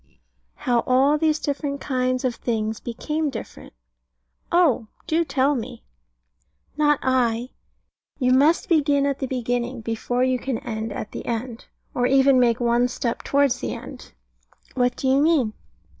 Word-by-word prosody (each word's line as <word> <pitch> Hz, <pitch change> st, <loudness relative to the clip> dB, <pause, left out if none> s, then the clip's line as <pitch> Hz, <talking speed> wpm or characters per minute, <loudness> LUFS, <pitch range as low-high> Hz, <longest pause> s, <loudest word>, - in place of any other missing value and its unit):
How 240 Hz, -1 st, +1 dB
all 275 Hz, +4 st, +3 dB
these 310 Hz, -1 st, +2 dB
different 285 Hz, -1 st, -3 dB
kinds 255 Hz, -2 st, -1 dB
of 250 Hz, -, +1 dB
things 220 Hz, -2 st, -2 dB
became 300 Hz, +6 st, -3 dB
different. 235 Hz, -5 st, -9 dB, 0.8 s
Oh, 315 Hz, -10 st, +3 dB, 0.2 s
do 330 Hz, +2 st, +1 dB
tell 275 Hz, -1 st, +1 dB
me! 240 Hz, -2 st, -6 dB, 0.9 s
Not 295 Hz, -1 st, +3 dB
I. 250 Hz, -2 st, +1 dB, 0.7 s
You 255 Hz, -2 st, +2 dB
must 290 Hz, +6 st, +3 dB
begin 290 Hz, -4 st, +3 dB
at 280 Hz, -1 st, -1 dB
the 265 Hz, -, -2 dB
beginning, 245 Hz, -1 st, -2 dB
before 230 Hz, +2 st, -1 dB
you 255 Hz, -1 st, +1 dB
can 260 Hz, -2 st, -2 dB
end 220 Hz, -1 st, -5 dB
at 210 Hz, -, -6 dB
the -, -, -7 dB
end, 235 Hz, 0 st, -4 dB, 0.3 s
or 245 Hz, 0 st, +1 dB
even 270 Hz, 0 st, +5 dB
make 235 Hz, -2 st, +3 dB
one 240 Hz, 0 st, +2 dB
step 240 Hz, -1 st, -3 dB
towards 280 Hz, -2 st, +2 dB
the 115 Hz, -2 st, -3 dB
end. -, -, -11 dB, 0.6 s
What 245 Hz, -1 st, +1 dB
do 265 Hz, -, -3 dB
you 265 Hz, +2 st, +4 dB
mean? 290 Hz, -9 st, +2 dB
255 Hz, 150 wpm, -23 LUFS, 240-280 Hz, 0.9 s, even